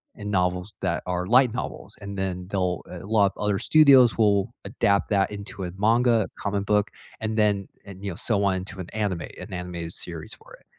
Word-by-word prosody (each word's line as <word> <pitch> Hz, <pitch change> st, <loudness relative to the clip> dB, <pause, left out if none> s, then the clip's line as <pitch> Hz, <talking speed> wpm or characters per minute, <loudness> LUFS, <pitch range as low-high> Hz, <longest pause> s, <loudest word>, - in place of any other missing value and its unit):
and 105 Hz, -1 st, -6 dB
novels 90 Hz, +1 st, 0 dB
that -, -, -1 dB
are 90 Hz, 0 st, -2 dB
light 125 Hz, +2 st, +4 dB
novels, 110 Hz, -4 st, -6 dB
and 100 Hz, 0 st, -6 dB
then 90 Hz, -1 st, -3 dB
they'll 90 Hz, -3 st, 0 dB
a 90 Hz, +1 st, -8 dB
lot 100 Hz, -2 st, +3 dB
of -, -, -9 dB
other 105 Hz, -1 st, +1 dB
studios 135 Hz, -7 st, +6 dB
will 105 Hz, +1 st, +2 dB
adapt 100 Hz, 0 st, +1 dB
that 100 Hz, 0 st, +2 dB
into 100 Hz, -1 st, -7 dB
a 90 Hz, -, -4 dB
manga, 115 Hz, +1 st, +3 dB
a -, -, -9 dB
comic 100 Hz, 0 st, -1 dB
book, 105 Hz, 0 st, +1 dB, 0.3 s
and 110 Hz, 0 st, -2 dB
then, 100 Hz, -2 st, +2 dB, 0.2 s
and, 100 Hz, 0 st, -11 dB
you 100 Hz, -, -3 dB
know, -, -, -7 dB
so 100 Hz, -1 st, 0 dB
on 95 Hz, -1 st, +2 dB
into 95 Hz, +1 st, -6 dB
an 90 Hz, -, -8 dB
anime 100 Hz, -6 st, -1 dB
an 90 Hz, -, -9 dB
animated 90 Hz, -2 st, -5 dB
series 80 Hz, -3 st, -7 dB
for -, -, -18 dB
it. -, -, -27 dB
100 Hz, 210 wpm, -25 LUFS, 90-105 Hz, 0.3 s, studios